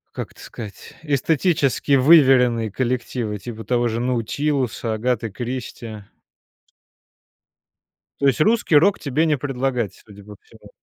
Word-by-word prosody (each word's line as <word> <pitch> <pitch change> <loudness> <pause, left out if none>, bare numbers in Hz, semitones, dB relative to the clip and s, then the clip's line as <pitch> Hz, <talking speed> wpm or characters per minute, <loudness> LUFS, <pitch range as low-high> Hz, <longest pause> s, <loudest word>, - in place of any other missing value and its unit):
как - - -5
это - - -21
сказать, 105 -4 -10
эстетически 145 -1 +1
выверенные 130 - +5
коллективы, 120 -3 -2
типа 110 +2 -8
того 120 +1 +1
же 115 +1 -3
"Наутилуса", 125 0 -1
"Агаты 115 0 -1
Кристи". 115 -2 -6 2.1
То 140 - +2
есть 135 - +2
русский 215 -1 +2
рок 195 +6 +4
тебе 145 +3 0
не 150 -3 +1
предлагать, 130 -5 -2
судя 100 -1 -14
по 105 0 -12
всему? - - -18
125 Hz, 120 wpm, -21 LUFS, 115-140 Hz, 2.1 s, выверенные